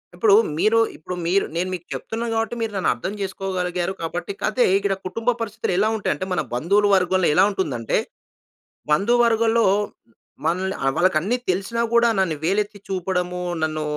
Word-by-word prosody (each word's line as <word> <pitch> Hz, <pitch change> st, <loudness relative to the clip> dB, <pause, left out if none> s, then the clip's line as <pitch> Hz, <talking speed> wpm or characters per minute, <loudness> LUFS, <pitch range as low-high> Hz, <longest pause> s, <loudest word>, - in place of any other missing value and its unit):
ఇప్పుడు 200 Hz, +3 st, +5 dB, 0.2 s
మీరు 215 Hz, +4 st, +3 dB, 0.2 s
ఇప్పుడు 180 Hz, +4 st, -6 dB
మీరు 185 Hz, +4 st, +2 dB
నేను 180 Hz, +2 st, -1 dB
మీకు 175 Hz, -1 st, -6 dB
చెప్తున్నాను 230 Hz, +1 st, -4 dB
కాబట్టి, 225 Hz, +1 st, -1 dB
మీరు 225 Hz, -2 st, -1 dB
నన్ను 190 Hz, -, +1 dB
అర్థం 190 Hz, -, -5 dB
చేసుకోగలిగారు 185 Hz, -2 st, -2 dB
కాబట్టి, 175 Hz, +3 st, -4 dB
కాతే 215 Hz, +4 st, +2 dB
ఇక్కడ 200 Hz, 0 st, 0 dB
కుటుంబ 230 Hz, +5 st, -2 dB
పరిస్థితులు 220 Hz, -3 st, -2 dB
ఎలా 210 Hz, +3 st, +3 dB
ఉంటాయి 210 Hz, -, 0 dB
అంటే, 185 Hz, -, -4 dB
మన 180 Hz, -, +1 dB
బంధువుల 200 Hz, +11 st, +2 dB
వర్గంలో 185 Hz, -1 st, +2 dB
ఎలా -, -, +6 dB
ఉంటుందంటే, 140 Hz, -, -1 dB, 0.9 s
బంధువర్గలో 230 Hz, +4 st, +3 dB, 0.8 s
మనల్ని 185 Hz, +3 st, 0 dB, 0.2 s
వాళ్ళకి 185 Hz, -2 st, +3 dB
అన్ని 235 Hz, +8 st, 0 dB
తెలిసినా 195 Hz, +6 st, -2 dB
కూడా 235 Hz, 0 st, +5 dB
నన్ను 170 Hz, -5 st, +1 dB
వేలెత్తి 205 Hz, +4 st, 0 dB
చూపడము. 180 Hz, -1 st, -2 dB, 0.2 s
నన్ను 155 Hz, -1 st, -1 dB
190 Hz, 150 wpm, -22 LUFS, 180-220 Hz, 0.9 s, ఎలా